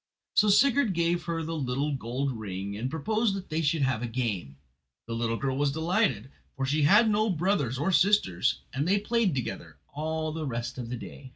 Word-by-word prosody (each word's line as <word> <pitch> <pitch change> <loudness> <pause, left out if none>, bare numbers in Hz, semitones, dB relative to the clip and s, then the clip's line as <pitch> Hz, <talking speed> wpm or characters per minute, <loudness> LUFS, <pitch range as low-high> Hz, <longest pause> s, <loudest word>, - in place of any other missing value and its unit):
So 210 - +5
Sigurd 240 -1 +4
gave 170 0 +1
her 165 -1 -2
the 165 +1 -4
little 140 +1 -1
gold 130 +2 -2
ring, 100 -3 -5
and 120 +5 -3
proposed 210 - 0
that 195 -1 -7
they 160 +1 -1
should 155 -1 +1
have 130 -4 0
a 120 - -2
game. 105 - -3 0.5
The 115 - -5
little 115 0 -1
girl 135 0 -1
was 140 0 +1
delighted, 160 - 0 0.3
for 135 - -1
she 145 +3 +1
had 210 +10 +6
no 215 +1 +2
brothers 165 - 0
or 155 +8 0
sisters, 180 - +2
and 140 +4 -1
they 200 +2 +4
played 210 -4 +1
together 85 - -5 0.2
all 155 +1 -2
the 155 -1 -4
rest 120 +1 -4
of 120 -2 -5
the 125 - -3
day. 130 +3 -10
145 Hz, 200 wpm, -28 LUFS, 125-180 Hz, 0.5 s, had